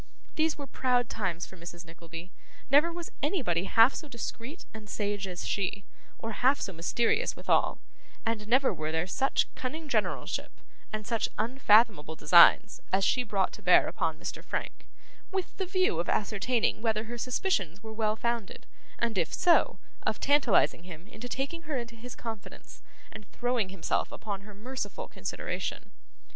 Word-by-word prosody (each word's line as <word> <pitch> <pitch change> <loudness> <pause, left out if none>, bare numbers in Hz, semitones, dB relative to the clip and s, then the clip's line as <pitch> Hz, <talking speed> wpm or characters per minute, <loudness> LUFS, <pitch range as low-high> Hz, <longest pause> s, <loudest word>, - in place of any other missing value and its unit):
These 315 0 +1
were 285 - -6
proud 250 -3 +1
times 180 -5 -2
for - - -13
Mrs 170 0 -9
Nickleby; 170 +1 -10 0.4
never 300 +5 +6
was 340 0 -6
anybody 250 - 0
half 225 +6 +6
so 310 - -6
discreet 240 +4 -6
and 215 -1 -10
sage 205 -1 -2
as 180 -1 -5
she, 200 0 -1 0.3
or 225 - -5
half 260 +6 +3
so 195 - -4
mysterious 235 - +1
withal; - - +2 0.5
and 225 -2 -1
never 260 +4 +4
were 155 0 -3
there 160 +1 0
such 265 +9 +1
cunning 305 +5 -5
generalship, 285 - -1 0.4
and 215 -1 -4
such 230 0 0
unfathomable 215 - +3
designs, 175 +6 +6
as 190 0 +3
she 255 - +3
brought 205 -5 0
to - - -10
bear - - +6
upon - - -1
Mr. - - -6
Frank, - - -5 0.4
with 380 -2 -3
the 380 - -2
view 370 - +2
of 170 - -1
ascertaining 220 +2 +1
whether 220 -2 +1
her 235 +1 -7
suspicions 215 - -1
were 220 0 -7
well 215 -1 0
founded: 235 -2 -3 0.3
and 230 -4 0
if 170 - 0
so, 345 -1 +4 0.2
of - - -1
tantalising 275 - +3
him 170 -1 -10
into 240 +3 -8
taking 275 +7 -3
her 290 - 0
into 235 -1 -5
his 240 +2 -9
confidence 225 -4 -9 0.3
and - - -11
throwing 245 -5 0
himself 190 -2 -1
upon 200 -2 -5
her 205 0 -13
merciful 255 +6 -5
consideration. - - -4
225 Hz, 160 wpm, -29 LUFS, 195-260 Hz, 0.5 s, never